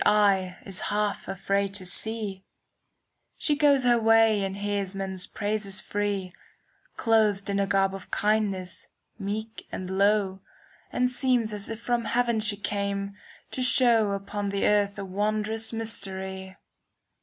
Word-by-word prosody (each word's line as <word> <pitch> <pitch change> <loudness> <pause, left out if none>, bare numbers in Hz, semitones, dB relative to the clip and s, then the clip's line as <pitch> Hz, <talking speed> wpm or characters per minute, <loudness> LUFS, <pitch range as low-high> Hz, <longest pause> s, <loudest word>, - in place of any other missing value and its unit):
Now 195 -3 +3
his 195 -2 -2
words 210 -1 0
take - - -18
a 195 - -3
54 195 +1 -1
CANZONIERE 200 +1 -3 1.0
She 295 - +3
goes 285 -3 +4
her 240 -1 +4
way 225 -2 +4
and 195 0 -3
hears 200 -1 -2
men's 190 -1 -3
praises 205 -2 -2
free, 200 -2 -2 0.3
* - - -38
Clothed 210 -3 +2
in 200 - 0
a 200 - +1
garb 195 0 +2
of 195 -1 -8
kindness, 205 -4 -1 0.3
meek 215 +3 -5
and 185 0 -5
low, 195 0 +2 0.5
And 250 - +2
seems 250 -3 +1
as 205 -1 -6
if 225 -1 -5
from 235 0 -1
heaven 235 -1 +1
she 210 -1 +2
came, 200 -1 -2 0.4
to 255 - -3
show 235 -5 +5
Upon 200 +1 -3
the 200 0 0
earth 205 -1 +2
a 200 - -4
wondrous 215 +3 -1
mystery. 190 -4 -4
205 Hz, 145 wpm, -27 LUFS, 195-220 Hz, 1.0 s, show